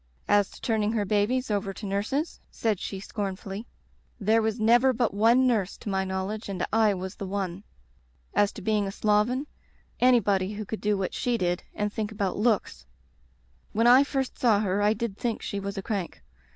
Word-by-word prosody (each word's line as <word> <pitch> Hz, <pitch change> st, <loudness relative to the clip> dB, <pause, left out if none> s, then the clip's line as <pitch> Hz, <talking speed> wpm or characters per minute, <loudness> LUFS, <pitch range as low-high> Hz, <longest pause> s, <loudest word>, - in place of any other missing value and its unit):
"As 205 Hz, -1 st, +3 dB
to -, -, -14 dB
turning 220 Hz, -2 st, 0 dB
her 210 Hz, -3 st, 0 dB
babies 215 Hz, +5 st, +1 dB
over 195 Hz, -1 st, -1 dB
to 210 Hz, -, -8 dB
nurses," 210 Hz, -, -2 dB
said 215 Hz, -5 st, -1 dB
she 195 Hz, -, -5 dB
scornfully, 200 Hz, +1 st, -5 dB, 0.3 s
*' -, -, -38 dB
there 225 Hz, +1 st, +5 dB
was 220 Hz, +1 st, -1 dB
never 240 Hz, +4 st, +5 dB
but 235 Hz, -3 st, 0 dB
one 230 Hz, +5 st, +4 dB
nurse, 215 Hz, -7 st, +1 dB
to -, -, -7 dB
my 190 Hz, -1 st, 0 dB
knowledge, 190 Hz, +3 st, -4 dB
and 195 Hz, -, -2 dB
I 220 Hz, -2 st, +4 dB
was 185 Hz, 0 st, -5 dB
the 195 Hz, -, -5 dB
one. 190 Hz, -1 st, -3 dB, 0.7 s
As 205 Hz, 0 st, +3 dB
to -, -, -9 dB
being 210 Hz, -2 st, +1 dB
a -, -, -3 dB
sloven, 215 Hz, +7 st, +1 dB, 0.5 s
anybody 205 Hz, -6 st, +3 dB
who 210 Hz, +1 st, -5 dB
could 220 Hz, -, -5 dB
do 210 Hz, -1 st, +1 dB
what 190 Hz, -1 st, -2 dB
she 245 Hz, -1 st, 0 dB
did 175 Hz, -2 st, 0 dB
and 210 Hz, 0 st, -2 dB
think 215 Hz, -1 st, -3 dB
about 200 Hz, -3 st, -2 dB
looks 205 Hz, -, 0 dB, 0.4 s
" 60 Hz, 0 st, -37 dB
When 225 Hz, +2 st, +2 dB
I 250 Hz, +3 st, +8 dB
first 270 Hz, -2 st, -3 dB
saw 220 Hz, -5 st, +4 dB
her 200 Hz, -1 st, 0 dB
I 210 Hz, +1 st, +4 dB
did 220 Hz, -2 st, -4 dB
think 235 Hz, -2 st, -2 dB
she 200 Hz, -, -3 dB
was 200 Hz, +1 st, -5 dB
a 195 Hz, -, -3 dB
crank. 195 Hz, -5 st, -4 dB
210 Hz, 200 wpm, -27 LUFS, 195-225 Hz, 0.7 s, I